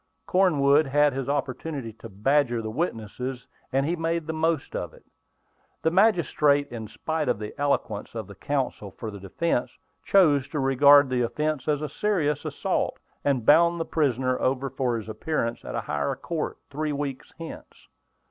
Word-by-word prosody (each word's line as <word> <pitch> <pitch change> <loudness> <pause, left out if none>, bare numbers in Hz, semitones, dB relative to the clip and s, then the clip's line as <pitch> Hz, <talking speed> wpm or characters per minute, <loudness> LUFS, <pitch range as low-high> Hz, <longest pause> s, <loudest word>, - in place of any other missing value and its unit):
Cornwood 155 -6 +4
had 145 +1 +3
his 135 0 -3
opportunity 140 -3 -3
to 115 +1 -11
badger 120 +4 +1
the 110 - -4
witnesses, 125 - -3 0.3
and 135 +1 +1
he 170 +3 0
made 165 -1 -1
the 160 - -3
most 160 -2 -1
of - - -4
it. - - -20 0.8
The 160 - +3
magistrate, 165 -7 +3
in 115 -2 -6
spite 155 +6 -2
of 120 - +1
the 105 0 -6
eloquence 130 -7 -1
of 110 -2 -4
the 100 - -11
counsel 130 -3 -2
for 110 +3 -7
the 100 - -9
defence, 120 - -2 0.3
chose 150 -9 +4
to 150 - -3
regard 140 +2 +6
the 125 -1 +1
offence 150 +4 -1
as 150 0 +1
a - - -1
serious 150 -4 0
assault, - - -1 0.3
and 135 -5 +1
bound 170 +4 +5
the 165 - -1
prisoner 130 -4 0
over 135 0 0
for 125 -3 0
his 110 - -7
appearance 115 0 -2
at - - -6
a - - -1
higher 75 -1 -2
court, 165 -3 -4
three 150 +2 -2
weeks 140 -2 -4
hence. 165 -1 -10
140 Hz, 170 wpm, -26 LUFS, 125-155 Hz, 0.8 s, regard